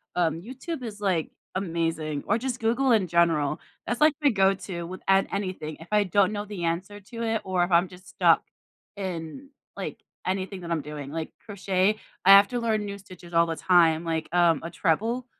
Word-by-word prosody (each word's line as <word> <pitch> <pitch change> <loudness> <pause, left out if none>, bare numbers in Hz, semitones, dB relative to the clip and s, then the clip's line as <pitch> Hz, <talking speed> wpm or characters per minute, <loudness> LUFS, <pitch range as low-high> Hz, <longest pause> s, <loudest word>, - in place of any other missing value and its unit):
Um, 165 -2 +1
YouTube 265 - -6
is, 210 -2 -7
like, 180 -6 0 0.2
amazing 165 -5 -2
or 210 - +3
just 250 0 -4
Google 240 +4 +2
in 200 -5 +2
general, 165 -4 +2 0.3
that's, 240 +2 -2
like, 305 0 +5
my 285 - +5
go 195 -3 +3
to 185 -2 -6
with 185 +2 -8
an 195 0 +4
anything, 185 -6 -3
if 165 - -11
I 210 -1 +3
don't 195 +2 +3
know 205 0 -3
the 200 -4 -6
answer 190 +5 -3
to 230 +4 -7
it 225 -1 0
or 185 -2 +1
if 175 - -9
I'm 175 +2 +4
just 185 0 -15
stuck - - +3 0.5
in, 185 - -6 0.3
like, - - -6 0.2
anything 190 0 -3
that 170 -1 -6
I'm 165 - 0
doing 145 -1 -7
like, 160 0 -4
crochet, 195 0 0 0.3
I - - +5
have 200 +1 +9
to 245 - -2
learn 220 -2 0
new 200 0 -5
stitches 180 -3 -14
all 170 0 +4
the 165 - -2
time, 170 -2 +4
like, 160 -1 -2
um, 170 -3 +4
a 165 - -4
treble 220 +9 0
185 Hz, 205 wpm, -26 LUFS, 170-210 Hz, 0.5 s, have